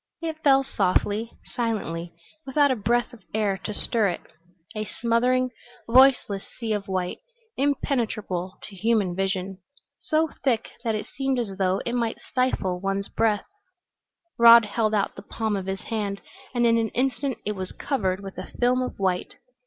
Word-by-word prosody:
It 320 -2 -4
fell 270 -1 +5
softly, 210 0 0 0.2
silently, 175 -8 -2 0.3
without 285 0 +3
a - - +2
breath 240 +4 0
of 235 - -13
air 210 -3 +1
to - - -2
stir 220 +1 +2
it; 175 - -4 0.5
a 215 - -1
smothering, 245 +4 +1 0.4
voiceless 245 -5 +5
sea 225 -3 -1
of 205 -1 -3
white, 185 -2 -2 0.4
impenetrable 225 - -1
to 205 - -10
human 205 -3 +1
vision, 190 0 -2 0.4
so 315 0 +1
thick 235 -5 +1
that 225 -2 0
it 215 - -3
seemed 270 0 -1
as 215 -5 -2
though 190 0 +2
it 235 - -2
might 235 -2 0
stifle 225 -8 -1
one's 195 0 -2
breath. 215 -2 +1 0.9
Rod 235 -1 +9
held 215 +1 0
out 200 - 0
the - - -8
palm 220 0 -2
of 190 -1 -4
his 190 0 -3
hand 205 -3 -3 0.4
and 240 0 +3
in 230 0 +4
an 225 -1 0
instant 265 +1 0
it 210 - 0
was 185 -1 -5
covered 195 -9 -1
with 195 -1 -8
a - - -7
film 250 +1 +3
of 255 - -4
white. 185 -2 -1
220 Hz, 165 wpm, -25 LUFS, 195-245 Hz, 0.9 s, Rod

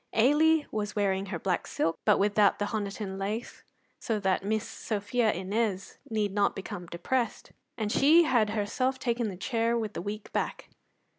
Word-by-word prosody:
Ailie 295 +6 +4
was 210 -1 -3
wearing 195 -1 0
her 185 -3 -3
black 180 0 -1
silk, 165 - -1
but 210 - +5
without 205 0 +3
the 205 - -1
Honiton 200 -2 -3
lace, 210 +5 -4 0.4
so 220 -2 -1
that 190 -1 +1
Miss 215 +2 -1
Sophia 220 +2 -1
Innes 195 +1 -2
need 210 -3 -1
not 205 0 +2
become 180 -2 -6
depressed; 230 +9 -2 0.3
and 215 -2 -2
she 315 +8 +6
had 240 -8 +2
herself 225 +5 -1
taken 235 -3 -1
the 185 - -7
chair 230 +3 0
with 215 -2 -3
the - - -4
weak 210 +1 -6
back. - - -3
210 Hz, 165 wpm, -29 LUFS, 200-235 Hz, 0.4 s, she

